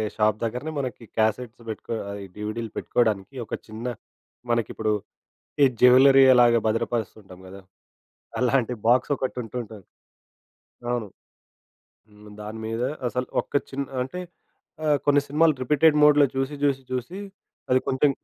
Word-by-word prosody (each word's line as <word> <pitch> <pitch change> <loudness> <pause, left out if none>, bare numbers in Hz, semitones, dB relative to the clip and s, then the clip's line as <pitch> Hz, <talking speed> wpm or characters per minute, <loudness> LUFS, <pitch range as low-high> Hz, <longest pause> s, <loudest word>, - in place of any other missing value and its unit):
Shop 105 -1 +2
దగ్గరనే 125 +7 -3
మనకి 125 -3 -5
cassettes 110 +2 0
పెట్టుకో 110 +1 -5 0.2
అది 100 0 -6
డీవీడీలు 110 +1 -5
పెట్టుకోడానికి 110 +1 0
ఒక - - -10
చిన్న 110 +3 -8 0.6
మనకిప్పుడు 110 -2 0 0.7
ఈ - - +9 0.2
జ్యువెల్లరీ 135 +2 +7
ఎలాగా 120 -1 +5
భద్రపరుస్తూ 115 -1 -1
ఉంటాం 95 -2 -14
గదా! 95 +1 -11 0.8
అలాంటి 125 -1 +2
బాక్స్ 125 +4 +3
ఒకటి 130 -1 -3
ఉంటుంటుంది. 110 -3 -7 1.1
అవును. 120 -3 -2 1.0
హ్మ్. 105 0 -16
దాని 110 +2 -7
మీద 115 +2 -3 0.3
అసలు 125 +1 -3 0.2
ఒక్క - - -29 0.2
చిన్న 140 +1 -3 0.2
అంటే 155 +8 -7 0.7
ఆహ్, 150 -1 +3
కొన్ని 145 0 +5
సినిమాలు 155 +2 +3
రిపీటెడ్ 150 +4 +4
మోడ్‌లో 150 -1 +6
చూసి, 135 +2 -1
చూసి 135 -2 +1
చూసి 130 +9 -4 0.5
అది 130 0 +4
కొంచెం 135 +2 +3
120 Hz, 130 wpm, -24 LUFS, 110-135 Hz, 1.1 s, ఈ